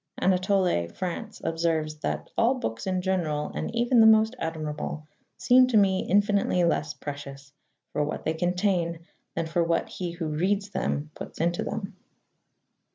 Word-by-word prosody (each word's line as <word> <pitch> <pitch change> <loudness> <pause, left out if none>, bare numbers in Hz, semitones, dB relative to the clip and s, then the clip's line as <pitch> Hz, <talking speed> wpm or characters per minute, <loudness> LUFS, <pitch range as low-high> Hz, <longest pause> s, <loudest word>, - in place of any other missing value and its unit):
Anatole 185 - +2
France 175 - -5
observes 160 -2 -1
that - - -3
"all 235 +3 +3
books 115 - -4
in 185 -1 0
general, 165 -6 -1
and - - -3
even 240 +1 +3
the 220 - +8
most 220 +2 +5
admirable, 155 -1 -4 0.3
seem 250 0 +5
to 245 -4 +3
me 190 -2 +3
infinitely 200 -2 +3
less 155 -3 0
precious 140 -1 -8 0.4
for 150 - +1
what 145 - -4
they 160 - +1
contain 175 -1 0 0.3
than 165 - -1
for 165 +1 +1
what 165 0 0
he 175 -2 -5
who 170 -1 -4
reads 195 +6 0 0.4
puts - - -9
into 170 +1 0
them." 210 -2 -5
175 Hz, 150 wpm, -27 LUFS, 155-200 Hz, 0.4 s, the